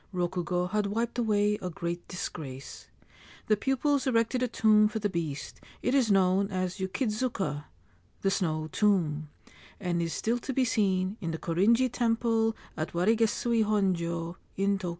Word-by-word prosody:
Rokugo 180 0 -1
had 210 -1 +1
wiped 230 +4 -2
away 210 -2 +2
a 180 - -3
great 170 +1 -4
disgrace. 140 -7 -7 0.6
The 215 - +3
pupils 270 +4 +1
erected 235 +1 +2
a 250 - +2
tomb 215 -2 +4
for 215 +1 -4
the 205 -2 -1
beast; 155 -5 -4 0.2
it 250 - +1
is 260 -5 +3
known 195 0 +3
as 185 -1 -2
' - - -14
Yukidzuka 190 - -2 0.3
' 90 -1 -35
(The 195 - +3
Snow 155 -4 -1
Tomb), 160 -8 +1 0.5
and 175 -3 -1
is 165 -1 -1
still 235 +2 0
to 265 - -4
be 260 0 +2
seen 195 -3 +1
in 165 - -3
the 160 - -2
Korinji 225 +11 +2
Temple 225 -2 +1 0.2
at 155 0 -4
Warigesui 225 +4 +2
Honjo, 175 -5 0 0.2
in 195 0 +1
Tokio. 180 - -3
200 Hz, 160 wpm, -29 LUFS, 175-225 Hz, 0.6 s, tomb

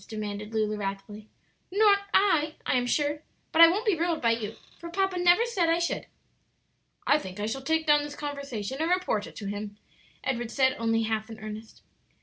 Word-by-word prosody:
demanded 210 -1 -5
Lulu, 215 -1 0
wrathfully. 205 +1 -6 0.4
"Not 405 0 +5
I, 315 -6 +3
I - - +1
am 245 -1 +1
sure. 295 +3 0 0.3
But 325 - +4
I 335 - +12
won't 400 +8 0
be 420 -4 +3
ruled 335 0 0
by 230 - +2
you, 225 -1 -3 0.2
for 340 - -8
papa 385 +1 0
never 355 +6 +5
said 380 -9 0
I 330 - +3
should." 340 0 -2 1.0
"I 290 - +4
think 190 -5 -9
I 205 - -1
shall 230 +5 -3
take 320 +3 0
down 295 -1 +5
this 290 0 -6
conversation 280 -4 -5
and 325 - 0
report 360 - 0
it - - -13
to 205 - -7
him," 205 +1 -5 0.5
Edward 240 -3 -2
said, 260 +1 +2
only 225 0 +1
half 220 0 -2
in 225 - -8
earnest. 215 +1 -9
270 Hz, 195 wpm, -27 LUFS, 215-335 Hz, 1.0 s, I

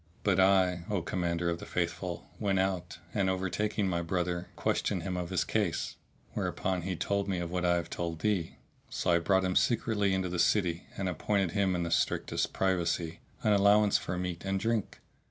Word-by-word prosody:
But - - +3
I, 95 -2 +4
O 100 -5 0
Commander 85 -1 -1
of 85 -1 0
the - - -8
Faithful, - - -3
went 100 -2 +1
out 95 -3 -1 0.2
and 100 -2 +1
overtaking 95 +2 0
my 85 -2 0
brother 90 +1 -2
questioned - - 0
him 95 -2 -3
of 90 -1 -3
his 95 - +1
case; 105 -6 -1 0.4
whereupon 95 -1 -1
he 90 +1 -2
told 100 +3 -1
me 95 -2 0
of 85 -1 -3
what 90 0 -1
I 85 0 +4
have 85 -1 -1
told 85 -2 -3
thee; 100 -6 0 0.3
so - - 0
I 85 - +5
brought 95 +2 +2
him 90 0 0
secretly 110 -4 +2
into 95 -1 0
the 90 0 -3
city, 85 -1 +2
and 95 - -1
appointed 95 +1 0
him 95 -1 +1
(in 85 - 0
the 85 - -3
strictest - - 0
privacy) 85 -3 0 0.2
an 105 - +4
allowance 100 +1 +5
for 90 - -4
meat 90 -1 -3
and 95 0 0
drink! 115 +1 -1
95 Hz, 190 wpm, -30 LUFS, 85-100 Hz, 0.4 s, I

